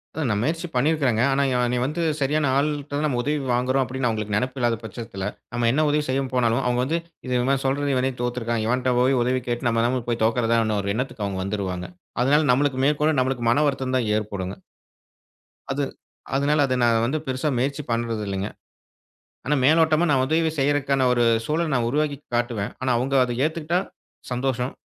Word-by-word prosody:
அதான், 155 -6 -1
நான் 105 - 0
முயற்சி 165 +5 -1
பண்ணிருக்கேங்க. 130 -4 +2
ஆனா 140 - +2 0.3
நீங்க 125 - 0
வந்து 155 +6 -2 0.2
சரியான 150 +1 +1
ஆள்ட்ட 145 +1 0
தான் 150 - 0
நாம 130 -5 0
உதவி 150 +3 0
வாங்குறோம் 130 +2 +2
அப்படின்னு 130 -1 -2
உங்களுக்கு 105 -2 -2
நெனைப்பு 125 +4 -1
இல்லாத 120 -1 +1
பட்சத்துல, 105 -3 -6 0.3
நாம 120 -1 +1
என்ன 155 +3 +2
உதவி 150 +1 +1
செய்யப் 135 0 -1
போனாலும் 120 +1 +2
அவங்க 125 0 +1
வந்து 160 +6 0 0.3
இதை 125 - -2
இவன் 135 +1 +1
சொல்றது 140 +1 +1
இவனே 130 +1 +1
தோத்துருக்கான். 120 -2 -1
இவன்ட்ட 125 +2 +1
போய் 130 0 +3
உதவி 125 +1 +1
கேட்டு 120 0 -1
நம்ம 115 0 +1
நம்மளுக்கு 120 -1 -1
போய் 115 -2 0
தோக்கிறதான்னு 115 -2 +1
ஒரு 100 0 -1
எண்ணத்துக்கு 120 -4 -3
அவங்க 95 -1 -3
வந்துருவாங்க. 95 -3 -3 0.3
அதனால 145 +3 +3
நம்மளுக்கு 135 +1 +1
மேற்கொண்டு 150 +1 +2
நம்மளுக்கு 130 -2 -1
மன 145 +5 +3
வருத்தம்தான் 130 -4 -1
ஏற்படுங்க. 100 -3 -4 1.2
அது 140 +1 -1 0.5
அதனால 145 +2 +2
அதை 130 - 0
நான் 115 -1 +3
வந்து 150 +6 -1
பெருசா 130 +3 -1
முயற்சி 140 +4 -1
பண்றது 115 -2 -1
இல்லைங்க. 100 +1 -2 1.0
ஆனா 150 - +2
மேலோட்டமா 160 +3 +4
நான் 130 -2 +3
உதவி 160 +3 +1
செய்யறதுக்கான 140 -1 +2
ஒரு 120 -1 +2 0.2
சூழலை 160 +1 0
நான் 120 -2 +1
உருவாக்கி 145 +1 0 0.2
காட்டுவேன். 120 -4 -1
ஆனா 130 0 +1
அவங்க 135 +3 -1
அதை 120 -1 -2
ஏத்துக்கிட்டா 165 +2 0 0.5
சந்தோஷம். 125 0 -1
130 Hz, 175 wpm, -23 LUFS, 120-145 Hz, 1.2 s, மேலோட்டமா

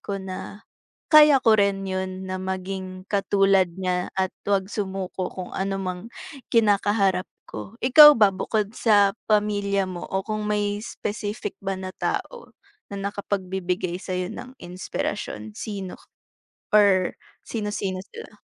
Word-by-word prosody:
ko 200 - -4
na 190 +3 -8 0.5
kaya 300 -2 +8
ko 220 -1 +6
rin 200 -1 +1
'yon 190 0 -3
na 185 - -3
maging 185 0 -5
katulad 195 -2 +3
niya 180 -1 -1
at 190 -1 0 0.2
'wag 195 -1 +1
sumuko, 190 -3 -3
kung 185 -1 -7
ano 195 +1 -1
mang 185 -1 -4 0.5
kinakaharap 205 -4 +2 0.2
ko. 210 - -8
Ikaw 295 +4 +9
ba, 210 -3 +5
bukod 210 +1 -1
sa 205 -3 +4
pamilya 205 -2 +1
mo 175 -2 -6
o 190 0 -2
kung 215 0 -3
may 205 0 0
specific 210 -2 -5
ba 195 0 -1
na 185 0 -5
tao - - -4 0.4
na - - -4
nakapagbibigay 190 -3 -3
sa 185 +1 -7
'yo 180 0 -1
ng 255 +7 -9
inspirasyon, 110 - -5
sino 195 -4 -6 0.8
or 200 -4 +4 0.3
sino-sino 205 -4 -3 0.2
sila? 460 0 -11
195 Hz, 135 wpm, -24 LUFS, 185-210 Hz, 0.8 s, Ikaw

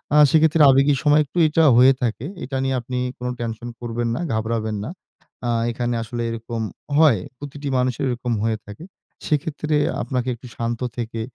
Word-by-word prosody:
আ - - +6
সেক্ষেত্রে 160 0 +4
আবেগী 140 +2 +4
সময় 150 0 +5
একটু 145 - -10
এটা 160 +2 +2
হয়ে 130 +2 +7
থাকে। 115 +1 -2 0.2
এটা 135 0 -3
নিয়ে 135 0 0
আপনি 125 +1 -5 0.2
কোন 125 - -5
টেনশন 115 0 -4
করবেন 120 0 -2
না, - - -3
ঘাবড়াবেন 110 0 -1
না। - - -5 0.6
আ - - 0 0.2
এখানে 120 0 -2
আসলে 120 +1 -5
এরকম 115 0 -4 0.4
হয়। 150 -10 +5 0.2
প্রতিটি 145 0 -7
মানুষের 125 0 0
এরকম 120 -1 -2
হয়ে 110 -1 0
থাকে। 105 +9 -10 0.4
সেক্ষেত্রে 150 +1 -1 0.3
আপনাকে 125 -2 -2
একটু 125 +2 -13
শান্ত 115 0 -2 0.2
থেকে 115 -1 -4
125 Hz, 170 wpm, -22 LUFS, 115-145 Hz, 0.6 s, হয়ে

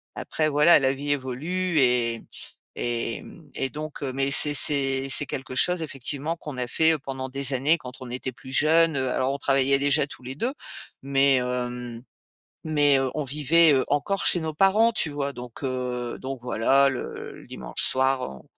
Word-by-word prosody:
après, 155 -1 -1
voilà, 150 +3 +6
la 135 0 +1
vie 145 +1 -4
évolue 155 +7 -2
et 120 -3 +1 0.5
et 115 -1 -2
mmh 160 -5 -14
et 135 - -2
donc, 155 +1 -7
mais 135 0 -1
c'est 145 +1 +4
c'est 135 -2 +2
c'est 145 - +2
quelque 130 -1 -6
chose 180 +5 +2
effectivement 145 +2 -4
qu'on 145 -5 -8
a 125 -1 -2
fait 160 +4 +3
pendant 130 -1 -5
des 135 +1 -3
années 145 +6 +3
quand 125 -5 -10
on 130 -1 -9
était 130 +1 -4
plus 130 +2 -12
jeune, 160 +2 +3
heu, 130 -1 -1
alors 130 +2 0
on 140 - -3
travaillait 135 0 +2
déjà 140 +1 +1
tous 130 - -13
les 130 +2 -7
2, 245 - -2 0.5
mais 135 0 +3
hem, 125 -1 -4 0.6
mais 145 -3 +3
heu, 135 -1 0
on 150 - -1
vivait, 150 +3 +3
heu, 130 - +2
encore 145 +8 -1
chez 175 - +4
nos 160 -1 -3
parents, 205 +7 +4
tu 160 - -1
vois? 140 -1 -3
Donc, 125 +1 -10
heu, 125 -2 -3
donc 135 0 -5
voilà, 135 +4 +3
le 130 - -6
le - - -17
dimanche - - -4
soir, 130 - +3
on 65 - -12
135 Hz, 185 wpm, -25 LUFS, 130-150 Hz, 0.6 s, voilà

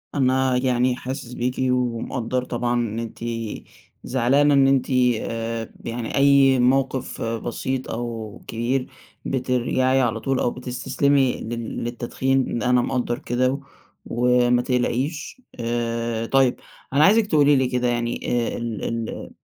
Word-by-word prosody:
أنا 130 -1 +2
يعني 125 -1 +1
حاسس 125 -1 -6
بيكِ، 125 +1 -2 0.2
ومقدّر 125 0 -1
طبعًا 120 -1 -2
إن 115 -2 -1
أنتِ 115 -1 -7 0.8
زعلانة 135 +4 +3
إن 135 -1 +5
أنتِ 135 -1 +2 0.3
آآ 115 0 -4
يعني 115 0 -4
أي 140 -2 +5
موقف 130 +1 +1
بسيط 120 +3 -3
أو 115 -3 -5
كبير، 125 +3 -1 0.4
بترجعي 130 0 +1
على 115 -2 0
طول 135 +3 -1
أو 120 - +1
بتستسلمي 130 +2 +1
لل 115 0 -5
للتدخين. 125 +2 -1
ن - - -3
أنا 125 -1 +3
مقدّر 125 -1 -1
كده، 130 +1 0 0.5
وما 125 0 +3
تقلقيش. 135 - -2 0.2
آآ 115 -1 -2
طيّب، 135 0 +3 0.4
أنا 145 +2 +5
عايزِك 215 +4 +5
تقولي 145 -4 +4
لي 130 -1 +2
كده 125 -1 0
يعني 120 0 -1 0.3
آآ - - -4
ال 115 -2 -4
ال 115 -1 -4
125 Hz, 130 wpm, -23 LUFS, 120-130 Hz, 0.8 s, إن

